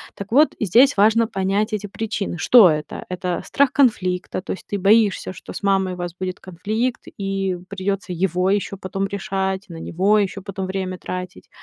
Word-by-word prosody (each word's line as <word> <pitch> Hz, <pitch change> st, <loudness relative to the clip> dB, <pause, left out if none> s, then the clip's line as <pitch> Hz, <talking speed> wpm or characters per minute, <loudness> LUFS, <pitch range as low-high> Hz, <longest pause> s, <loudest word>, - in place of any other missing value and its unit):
Так 200 Hz, +1 st, -8 dB
вот 295 Hz, +6 st, +5 dB
здесь 240 Hz, +7 st, +4 dB
важно 220 Hz, +3 st, +4 dB
понять 195 Hz, +3 st, -1 dB
эти 210 Hz, -1 st, -3 dB
причины. 205 Hz, -3 st, -4 dB
Что 215 Hz, +2 st, +7 dB
это? 150 Hz, -1 st, -3 dB
Это 180 Hz, -1 st, -3 dB
страх 280 Hz, -2 st, +2 dB
конфликта, 185 Hz, -10 st, +1 dB
то -, -, -6 dB
есть -, -, -6 dB
ты 205 Hz, -, -2 dB
боишься, 205 Hz, +1 st, +3 dB
что 170 Hz, -, -10 dB
с -, -, -7 dB
мамой 195 Hz, -2 st, +2 dB
у -, -, -8 dB
вас 175 Hz, -1 st, -4 dB
будет 185 Hz, -1 st, -4 dB
конфликт 215 Hz, +7 st, -3 dB, 0.2 s
и 195 Hz, -2 st, -1 dB
придется 195 Hz, -1 st, -3 dB
его 180 Hz, +1 st, 0 dB
ещё 200 Hz, 0 st, 0 dB
потом 195 Hz, +1 st, -3 dB
решать, 195 Hz, -1 st, -2 dB
на 165 Hz, -1 st, -8 dB
него 195 Hz, +6 st, +1 dB
ещё 195 Hz, -1 st, -2 dB
потом 190 Hz, 0 st, -5 dB
время 185 Hz, -1 st, -3 dB
тратить. 180 Hz, 0 st, -7 dB
195 Hz, 180 wpm, -21 LUFS, 185-210 Hz, 0.2 s, Что